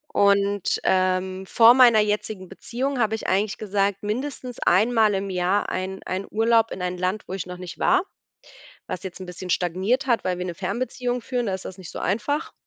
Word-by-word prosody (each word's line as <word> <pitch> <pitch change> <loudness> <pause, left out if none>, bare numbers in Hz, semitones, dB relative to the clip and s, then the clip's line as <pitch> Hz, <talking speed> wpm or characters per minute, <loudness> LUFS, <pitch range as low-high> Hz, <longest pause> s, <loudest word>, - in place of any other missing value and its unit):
Und, 200 -1 +2
ähm, 185 0 +1
vor 230 +4 +7
meiner 245 -4 +7
jetzigen 210 -2 -2
Beziehung 255 +7 -3
habe 220 -1 +2
ich 220 - -6
eigentlich 200 +2 +1
gesagt, 200 -1 -1
mindestens 250 +3 -4
einmal 215 +3 +3
im 195 0 -2
Jahr 185 +2 0
ein 190 +1 -4
ein 190 +1 -3
Urlaub 225 +1 +3
in 185 - -6
ein 180 0 -2
Land, 185 +4 -1
wo - - -6
ich 190 - -4
noch 180 0 -7
nicht 180 -2 -9
war, 370 +1 +3 0.8
was 180 - -5
jetzt 190 -2 -7
'n - - -5
bisschen 180 +1 -8
stagniert 190 +10 0
hat, 240 -3 +1
weil 180 -1 0
wir 180 - -3
'ne 175 -1 -4
Fernbeziehung 245 +6 -3
führen, 245 -1 -2
da 195 - -1
ist 190 - -6
das 190 - -8
nicht 185 - -9
so - - -7
einfach. 230 - -1
200 Hz, 200 wpm, -24 LUFS, 185-230 Hz, 0.8 s, vor